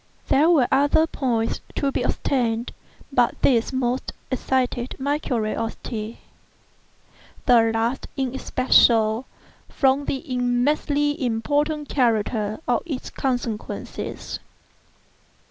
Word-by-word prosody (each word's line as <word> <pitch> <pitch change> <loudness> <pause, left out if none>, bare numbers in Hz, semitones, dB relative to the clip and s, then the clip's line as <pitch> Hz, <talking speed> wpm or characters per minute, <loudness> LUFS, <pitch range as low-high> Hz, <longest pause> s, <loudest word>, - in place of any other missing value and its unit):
There 300 +5 +5
were 290 -8 +4
other 285 +4 +4
points 240 -7 -1
to 280 -1 0
be 250 - -1
ascertained, 240 -3 0 0.4
but 245 -2 +2
these 235 -4 +3
most 260 -1 -1 0.2
excited 255 -1 -1
my 285 +2 0
curiosity—the 225 -2 -3 1.6
last 230 +4 -1
in 265 -2 -1
especial, 235 -3 +3 0.4
from 270 +1 +2
the 270 +1 -2
immensely 285 +4 +1
important 290 +6 0
character 220 -3 0
of 240 -2 +2
its 275 -6 -5
consequences. 245 -5 -4
255 Hz, 95 wpm, -23 LUFS, 230-280 Hz, 1.6 s, There